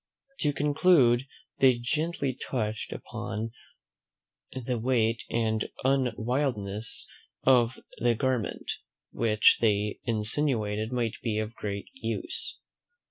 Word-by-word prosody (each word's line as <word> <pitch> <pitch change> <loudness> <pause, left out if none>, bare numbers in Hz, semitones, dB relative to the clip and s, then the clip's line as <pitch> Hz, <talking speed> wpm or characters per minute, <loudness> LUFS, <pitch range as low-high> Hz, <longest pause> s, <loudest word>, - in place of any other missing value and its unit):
To 150 - +2
conclude, 145 -3 +4 0.3
they 130 -2 +6
gently 145 +2 -1
touched 110 -4 -3
upon 110 +2 -4 1.0
the 125 -1 -3
weight 115 -1 +1
and 110 -2 0
unwieldiness 120 -4 0 0.4
of 125 -2 +4 0.2
the 120 -1 +3
garment, 125 -4 -1 0.4
which 110 -3 +4
they 105 -2 +2
insinuated 110 -1 0
might 120 -3 -1
be 110 -3 -1
of 110 +1 -2
great 100 -2 -5
use. 270 - -4
120 Hz, 95 wpm, -28 LUFS, 110-130 Hz, 1.0 s, they